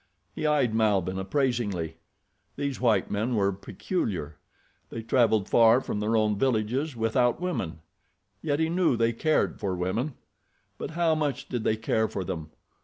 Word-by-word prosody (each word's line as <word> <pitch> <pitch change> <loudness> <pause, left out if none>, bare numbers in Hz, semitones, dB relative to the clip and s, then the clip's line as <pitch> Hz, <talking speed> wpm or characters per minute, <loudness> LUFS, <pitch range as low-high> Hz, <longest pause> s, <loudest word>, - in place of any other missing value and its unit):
He 155 - -2
eyed 140 -7 +2
Malbihn 100 -4 +1
appraisingly. 105 - -1 0.6
These 140 -3 -3
white 115 -3 +2
men 110 +4 0
were 100 -2 +2
peculiar. 95 - -4 0.5
They 115 - -6
traveled 110 -4 +2
far 115 +1 +6
from 105 - -4
their 110 +2 +1
own 105 -2 +1
villages 130 +3 0
without 120 +3 +1
women. 170 - -3 0.6
Yet 145 -2 0
he 160 - +2
knew 170 -6 +2
they 115 0 +2
cared 155 +7 +1
for 95 -2 -1
women. 110 +11 -2 0.6
But - - -4
how 170 -2 +3
much 150 -4 -2
did 120 -3 -2
they 110 - +1
care 110 0 +1
for 95 - -4
them? 80 -3 -5
115 Hz, 155 wpm, -27 LUFS, 100-135 Hz, 0.6 s, far